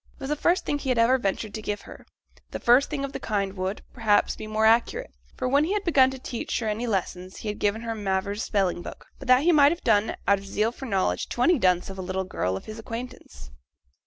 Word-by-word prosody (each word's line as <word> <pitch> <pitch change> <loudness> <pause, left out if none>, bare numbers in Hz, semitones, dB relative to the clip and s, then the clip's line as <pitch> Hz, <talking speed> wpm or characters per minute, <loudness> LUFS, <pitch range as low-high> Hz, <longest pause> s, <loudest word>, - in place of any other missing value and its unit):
It - - -27
was 270 - -4
the 300 - +1
first 345 +5 +1
thing 290 - -1
he 275 - -4
had 250 - +2
ever 240 +3 +4
ventured 200 0 -2
to 215 - -5
give 205 -1 -3
her - - -13 0.4
the - - -5
first 245 +4 +4
thing 280 -2 -2
of 275 - -8
the - - -4
kind 200 -3 -2
would, 190 +1 -4
perhaps, 220 -4 +2
be 215 - -8
more 215 0 +1
accurate; 240 - +2 0.3
for - - -1
when 280 +3 +3
he 350 +6 0
had 420 - 0
first - - -25
begun 260 -1 +6
to 265 - -7
teach 245 -2 -4
her 225 - -3
any 220 +3 -2
lessons, 185 -3 -3
he 215 - -5
had 210 - -5
given 205 +2 0
her 230 -1 -3
Mavor's 200 0 -2
Spelling 190 -4 0
book, - - -9
but 275 - -10
that 255 +2 +5
he 350 - +5
might 290 -2 +6
have 340 - -4
done, 215 -1 +2
out 200 0 +4
of 195 - -12
zeal 210 +3 0
for 265 +2 -8
knowledge, 195 -4 0
to 240 - -1
any 340 +1 +4
dunce 180 -1 +2
of 190 - -9
a - - -2
little 185 +1 -2
girl 95 - -2
of - - -10
his 215 +1 -8
acquaintance. 225 - -8
220 Hz, 265 wpm, -25 LUFS, 195-260 Hz, 0.4 s, begun